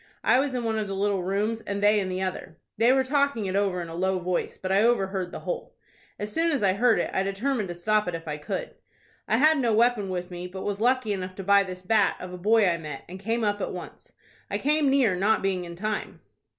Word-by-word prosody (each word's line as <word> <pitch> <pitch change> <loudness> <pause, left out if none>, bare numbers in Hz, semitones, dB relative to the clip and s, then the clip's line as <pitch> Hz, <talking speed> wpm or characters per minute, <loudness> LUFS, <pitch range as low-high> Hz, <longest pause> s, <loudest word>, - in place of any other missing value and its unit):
I 250 - +4
was 270 -1 -1
in 245 - -2
one 220 -1 0
of 210 - -2
the 195 - -4
little 200 -1 0
rooms, 205 +5 -1
and 200 -2 -4
they 210 +1 +4
in 190 -2 -2
the 185 +1 -2
other. 185 -3 -5 0.2
They 230 +3 +4
were 265 0 +3
talking 280 -4 +1
it 190 0 -2
over 195 -3 0
in - - -8
a 165 - -8
low 190 +2 0
voice; 180 0 -2
but 185 - -4
I 195 +1 +4
overheard 195 -6 +1
the - - -7
whole. - - -5 0.4
As 210 +1 -4
soon 330 +1 +2
as 280 -8 0
I 190 -2 +4
heard 230 +3 +3
it, - - -1
I - - +1
determined 205 +4 -1
to 175 - -5
stop 210 +3 +1
it 175 - -2
if 165 0 -8
I 150 -1 -3
could. - - -5 0.5
I 220 - +2
had 305 +3 +5
no 235 -4 +2
weapon 230 -3 +2
with 180 0 -4
me, 175 0 -6
but 190 +1 -7
was 205 0 -3
lucky 245 -3 +2
enough 185 -1 -5
to 195 - -6
buy 200 +1 +5
this 185 -1 -6
bat 210 +1 +3
of 185 0 -8
a - - -6
boy 215 +2 +4
I 170 -1 +1
met, 150 -4 -7
and 185 +2 -9
came 225 +4 -1
up 205 -1 0
at - - -3
once. 180 - -10 0.4
I - - -1
came 295 0 +2
near 260 -8 +3
not 200 +4 +2
being 185 -2 -1
in 170 0 -8
time." 215 +4 -4
200 Hz, 260 wpm, -26 LUFS, 185-230 Hz, 0.5 s, had